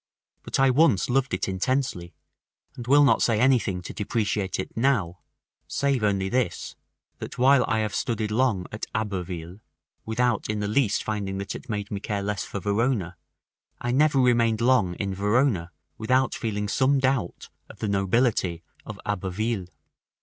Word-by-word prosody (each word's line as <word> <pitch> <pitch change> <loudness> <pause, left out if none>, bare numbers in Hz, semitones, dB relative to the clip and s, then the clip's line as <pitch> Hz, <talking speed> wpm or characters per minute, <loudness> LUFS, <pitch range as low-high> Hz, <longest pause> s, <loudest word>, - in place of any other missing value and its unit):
But - - -3
I 135 -1 +5
once 130 - +3
loved 135 +1 +1
it 90 - -1
intensely, 95 - -2 0.6
and 120 -1 -8
will 145 +2 +6
not 140 - +4
say 115 -3 +2
anything 120 -8 +2
to - - -7
depreciate 105 -2 -2
it 95 - -5
now, 110 -9 +1 0.5
save 140 -4 0
only 100 -2 +1
this, 120 -4 -2 0.4
that - - -7
while 130 +1 +5
I 110 0 +1
have 105 -1 -2
studied 110 -2 -2
long 110 -5 +1
at 110 - -5
Abbeville, 90 -3 -4 0.4
without 120 0 0
in 105 0 -1
the 105 - -1
least 105 -1 +1
finding 100 -3 -3
that 100 0 -4
it 130 - -10
made 105 -2 -4
me 100 - -3
care 100 -1 -3
less 105 -1 -2
for 100 - -5
Verona, 100 -2 0 0.6
I 120 - -2
never 145 +2 +3
remained 120 -3 +3
long 115 -7 +2
in 100 0 -3
Verona 100 -2 +1 0.3
without 130 +4 +2
feeling 105 -3 -3
some 135 +6 +2
doubt 130 -8 -1 0.2
of - - -13
the 110 - -3
nobility 100 -3 +1 0.2
of 105 -2 -9
Abbeville. 105 +1 -2
110 Hz, 160 wpm, -25 LUFS, 100-125 Hz, 0.6 s, will